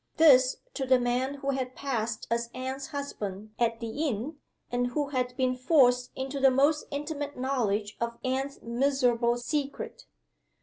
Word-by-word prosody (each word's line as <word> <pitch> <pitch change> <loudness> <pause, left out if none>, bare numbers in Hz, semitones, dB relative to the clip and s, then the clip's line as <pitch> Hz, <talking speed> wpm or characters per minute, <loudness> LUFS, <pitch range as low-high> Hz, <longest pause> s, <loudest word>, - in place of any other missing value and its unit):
This 265 -5 +6 0.2
to 265 -2 -3
the 255 -1 +5
man 250 +3 0
who 275 0 -2
had 255 -1 -3
passed 235 -5 -2
as 235 0 0
Anne's 260 +1 -4
husband 215 -9 -5
at 230 -1 +1
the 245 +7 -2
inn, 265 +5 -3 0.3
and 245 0 +1
who 285 +3 -1
had 250 -2 -2
been 255 -1 +1
forced 250 -2 +4
into 270 +1 -3
the 270 0 +6
most 285 +4 +3
intimate 290 0 -4
knowledge 220 -6 -1
of 235 0 -2
Anne's 270 +2 -2
miserable 240 -1 +2
secret! 280 +3 -3
255 Hz, 150 wpm, -29 LUFS, 240-280 Hz, 0.3 s, This